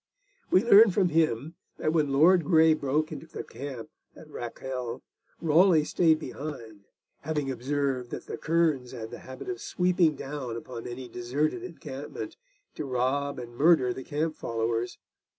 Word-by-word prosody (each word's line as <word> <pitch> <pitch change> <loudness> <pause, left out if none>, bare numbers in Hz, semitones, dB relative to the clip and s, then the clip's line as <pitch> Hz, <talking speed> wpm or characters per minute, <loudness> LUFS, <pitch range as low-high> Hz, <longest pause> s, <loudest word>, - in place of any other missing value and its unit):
We 185 - +4
learn 225 -1 +8
from 185 -1 +2
him 155 -2 +1 0.2
that 155 - 0
when 150 -4 +2
Lord 165 +6 +5
Grey 160 0 +5
broke 150 +1 0
into 160 - -7
the - - -7
camp 130 -1 -8 0.2
at - - -13
Rakele, 125 0 -5 0.4
Raleigh 165 0 +5
stayed 160 +1 +3
behind, 115 -11 -8 0.3
having 150 -2 -2
observed 130 0 -1
that - - -6
the - - -5
kerns 155 -6 +1
had 110 -1 -7
the - - -8
habit 130 - -10
of 370 -1 -4
swooping 180 -3 +2
down 135 -4 -5
upon 115 0 -7
any 125 +1 -7
deserted 125 - -1
encampment 370 - -7 0.4
to 150 - -5
rob 135 +2 0
and 120 -1 -8
murder 140 -3 +4
the 130 - -7
camp 155 +2 -2
followers. 115 +1 -2
145 Hz, 150 wpm, -28 LUFS, 125-160 Hz, 0.4 s, learn